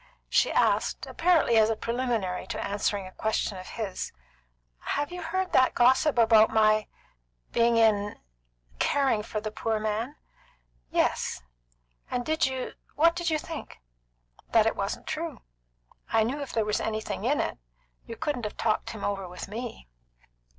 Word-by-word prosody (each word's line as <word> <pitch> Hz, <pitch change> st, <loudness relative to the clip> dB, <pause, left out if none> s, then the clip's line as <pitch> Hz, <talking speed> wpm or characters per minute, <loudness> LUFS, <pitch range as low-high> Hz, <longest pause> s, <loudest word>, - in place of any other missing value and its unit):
She -, -, +3 dB
asked, -, -, +1 dB
apparently 330 Hz, -9 st, +3 dB
as 220 Hz, 0 st, +5 dB
preliminary 230 Hz, -7 st, -1 dB
to -, -, -3 dB
answering 200 Hz, -1 st, -1 dB
a 185 Hz, -, -9 dB
question 215 Hz, -1 st, -1 dB
of 185 Hz, -, -9 dB
his, 210 Hz, -5 st, -4 dB, 0.7 s
"Have 290 Hz, +2 st, -2 dB
you 360 Hz, 0 st, -6 dB
heard 370 Hz, +3 st, -2 dB
that 260 Hz, 0 st, +4 dB
gossip 260 Hz, +4 st, +4 dB
about 225 Hz, -2 st, +6 dB
my 215 Hz, -1 st, +3 dB, 0.6 s
being 235 Hz, 0 st, +3 dB
in 205 Hz, -2 st, +3 dB, 0.6 s
caring 270 Hz, -6 st, +2 dB
for 215 Hz, 0 st, -4 dB
the 215 Hz, 0 st, -5 dB
poor 220 Hz, 0 st, -1 dB
man?" 220 Hz, +6 st, -2 dB, 0.7 s
"Yes." 60 Hz, -, 0 dB, 0.7 s
"And 245 Hz, -1 st, -2 dB
did 315 Hz, -3 st, +2 dB
you 260 Hz, -1 st, -4 dB, 0.2 s
what 335 Hz, +3 st, +4 dB
did 345 Hz, -1 st, -1 dB
you 315 Hz, -, +2 dB
think?" 315 Hz, 0 st, -8 dB, 0.7 s
"That -, -, +6 dB
it -, -, +1 dB
wasn't -, -, -3 dB
true. -, -, -4 dB, 0.7 s
I 225 Hz, -1 st, +4 dB
knew 265 Hz, +6 st, -2 dB
if 280 Hz, -, -5 dB
there 220 Hz, -2 st, 0 dB
were 210 Hz, -, -2 dB
anything 220 Hz, 0 st, -3 dB
in -, -, +2 dB
it, -, -, -2 dB, 0.5 s
you 230 Hz, -, -6 dB
couldn't 290 Hz, -6 st, -2 dB
have 210 Hz, -, -5 dB
talked 220 Hz, -2 st, 0 dB
him 215 Hz, -3 st, -7 dB
over 195 Hz, -2 st, -2 dB
with 180 Hz, -, -7 dB
me." 225 Hz, -, -6 dB
225 Hz, 155 wpm, -28 LUFS, 215-275 Hz, 0.7 s, about